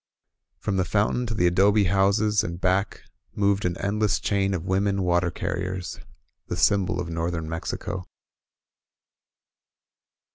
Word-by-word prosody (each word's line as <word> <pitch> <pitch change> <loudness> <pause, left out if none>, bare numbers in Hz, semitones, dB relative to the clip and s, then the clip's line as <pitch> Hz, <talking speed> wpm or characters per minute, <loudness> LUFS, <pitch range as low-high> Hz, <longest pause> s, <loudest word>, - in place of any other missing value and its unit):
From 100 - -2
the 95 - +2
foun 100 +3 +1
tain 125 - -1
to 115 - -2
the 90 - +2
adobe 100 +4 +4
houses 100 +3 +2
and 85 0 -5
back 95 +2 0 0.3
moved 100 -1 +1
an 90 0 -1
endless 105 -1 0
chain 100 -1 0
of 90 -1 -4
women 100 +1 +1
water 90 0 +2
carriers, 90 +1 -4 0.2
— - - -50
the - - -2
symbol 95 -3 +2
of 90 - -3
north 85 +1 -2
ern 80 -1 -4
Mexico. 80 +3 -4
95 Hz, 145 wpm, -25 LUFS, 90-100 Hz, 0.3 s, adobe